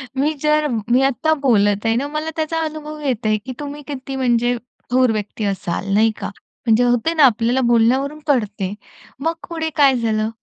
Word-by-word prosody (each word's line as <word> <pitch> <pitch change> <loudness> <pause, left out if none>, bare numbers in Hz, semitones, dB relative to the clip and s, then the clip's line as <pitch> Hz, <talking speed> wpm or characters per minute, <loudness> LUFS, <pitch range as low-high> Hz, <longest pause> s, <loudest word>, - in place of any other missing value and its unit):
मी 290 +4 +1
जर, 300 0 +3 0.2
मी 245 +2 +4
आता 275 +4 +2
बोलत 205 -5 +2
आहे 225 0 +2
ना 270 +4 -1
मला 305 +2 -3
त्याचा 320 0 -1
अनुभव 305 0 -6
येतंय, 225 -6 0
की 260 - -5
तुम्ही 290 0 -6
किती 270 -1 -6
म्हणजे 245 -2 +1 0.4
थोर 255 -1 +4
व्यक्ती 215 0 -4
असाल, 195 0 -2
नाही 220 +2 +4
का? - - -2 0.4
म्हणजे 225 +1 +4
होते 245 +6 +2
ना 315 -3 +4
आपल्याला 240 +1 +2
बोलण्यावरून 260 +6 +2
कळते. 210 -8 0 0.5
मग 325 +4 0 0.2
पुढे 320 -1 -2
काय 275 -3 +5
झालं? 220 -2 0
255 Hz, 175 wpm, -20 LUFS, 225-295 Hz, 0.5 s, काय